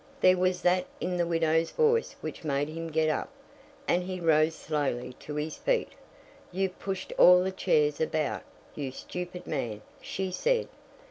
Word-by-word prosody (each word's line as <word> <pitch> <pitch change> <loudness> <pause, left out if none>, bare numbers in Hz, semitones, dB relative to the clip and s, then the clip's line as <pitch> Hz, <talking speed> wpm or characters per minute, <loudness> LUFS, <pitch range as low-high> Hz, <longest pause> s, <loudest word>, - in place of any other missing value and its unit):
There 185 -5 +6
was 185 0 0
that 180 +1 +3
in 180 0 -1
the 175 -1 +1
widow's 165 -1 +2
voice 460 0 +2
which - - -6
made 145 -1 0
him 165 +1 -5
get 160 0 +1
up, 155 - -1 0.6
and 180 - +3
he 185 0 -4
rose 160 -1 +3
slowly 135 -5 -2
to 150 - -7
his 150 +1 -3
feet. - - 0 0.6
"You've 190 0 -2
pushed 190 -1 -4
all 180 0 +8
the 190 - -1
chairs 150 -5 +1
about, 155 -1 0 0.3
you 140 -3 -4
stupid 180 +6 -6
man," 115 -8 -3 0.2
she 190 -1 -3
said. 475 - +1
165 Hz, 160 wpm, -29 LUFS, 155-185 Hz, 0.6 s, all